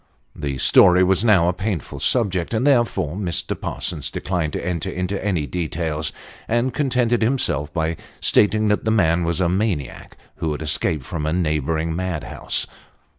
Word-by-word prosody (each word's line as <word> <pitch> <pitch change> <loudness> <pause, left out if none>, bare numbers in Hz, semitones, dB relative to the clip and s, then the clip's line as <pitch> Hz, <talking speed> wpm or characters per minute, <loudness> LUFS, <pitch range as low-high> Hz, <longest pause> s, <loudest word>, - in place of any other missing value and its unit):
The 70 -2 -4
story 90 +7 +6
was 95 +2 +2
now 100 -7 +4
a 90 - +2
painful 100 -3 -4
subject, 100 -5 0
and 115 +4 0
therefore 120 - +2
Mr. 90 -6 -2
Parsons - - -4
declined 85 -4 -2
to - - -4
enter 85 -3 -2
into 90 +2 -3
any 90 -7 0
details, 80 0 -3 0.4
and 120 +2 0
contented 125 -4 +1
himself 110 - 0
by 80 0 -1 0.2
stating 110 +1 +3
that 105 - +1
the 110 - 0
man 85 -6 +2
was 85 +1 0
a 90 - +2
maniac, 90 - -2 0.2
who 80 -2 -1
had 75 +1 -5
escaped 75 -2 0
from 75 -3 -3
a 80 - 0
neighbouring 80 -1 0
mad 90 -4 -3
house. - - -1
90 Hz, 165 wpm, -21 LUFS, 80-105 Hz, 0.4 s, story